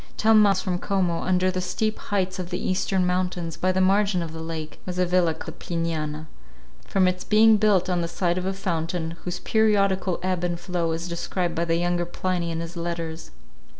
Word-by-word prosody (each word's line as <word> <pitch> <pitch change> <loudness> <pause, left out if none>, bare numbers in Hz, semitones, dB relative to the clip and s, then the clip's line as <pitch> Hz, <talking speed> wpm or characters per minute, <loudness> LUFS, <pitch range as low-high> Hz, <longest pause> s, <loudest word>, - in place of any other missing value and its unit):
Ten 220 0 +5
miles 200 -3 +4
from 180 -2 -2
Como, 180 -4 0
under 185 0 +2
the 185 0 -2
steep 215 +4 -1
heights 190 -2 -2
of 180 -1 -4
the 180 - -2
eastern 185 0 0
mountains, 180 -2 -1
by 185 - +1
the 185 - 0
margin 195 -1 +3
of 160 -1 -6
the 160 - -6
lake, 160 -1 -6
was 180 -1 -5
a 180 - +3
villa 175 -2 +2
called 160 +1 -9
the - - -13
Pliniana, 160 -3 -2 0.6
from 190 -2 +3
its 180 0 -1
being 220 +1 +5
built 205 -4 +3
on 180 -2 0
the 170 - -1
site 175 +1 0
of 185 - -3
a - - +1
fountain, 170 -3 -2
whose 180 0 -2
periodical 200 -4 +2
ebb 185 -1 -1
and 175 -1 -1
flow 175 -3 -1
is 165 +2 -4
described 175 0 -2
by 170 - -1
the 165 0 +1
younger 175 0 0
Pliny 175 -1 -2
in 165 0 -3
his 170 +1 -7
letters. 170 -1 -4
180 Hz, 210 wpm, -25 LUFS, 170-185 Hz, 0.6 s, Ten